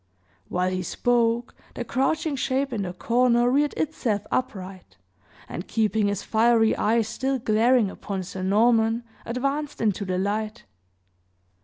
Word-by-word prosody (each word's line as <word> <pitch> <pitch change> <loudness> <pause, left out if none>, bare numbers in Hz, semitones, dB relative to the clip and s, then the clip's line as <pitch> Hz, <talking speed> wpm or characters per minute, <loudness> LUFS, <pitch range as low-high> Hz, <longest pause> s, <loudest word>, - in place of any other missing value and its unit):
While, 180 +1 0
he 185 0 -2
spoke, 235 +5 0 0.2
the 240 - -4
crouching 285 +4 0
shape 270 0 -1
in 215 - -1
the 180 -2 -4
corner 240 +4 +2
reared 290 +2 +2
itself 240 -10 -1
upright, 190 - -4 0.5
and 175 - -6
keeping 220 -1 +1
his 200 -1 -2
fiery 225 0 +3
eyes 225 0 +1
still 265 +4 -1
glaring 225 -1 +3
upon 195 -2 -5
Sir 185 +1 -7
Norman, 225 +4 +3 0.2
advanced 275 +5 -2
into 210 -3 0
the 185 -2 -2
light. 210 +3 -2
225 Hz, 135 wpm, -25 LUFS, 200-250 Hz, 0.5 s, fiery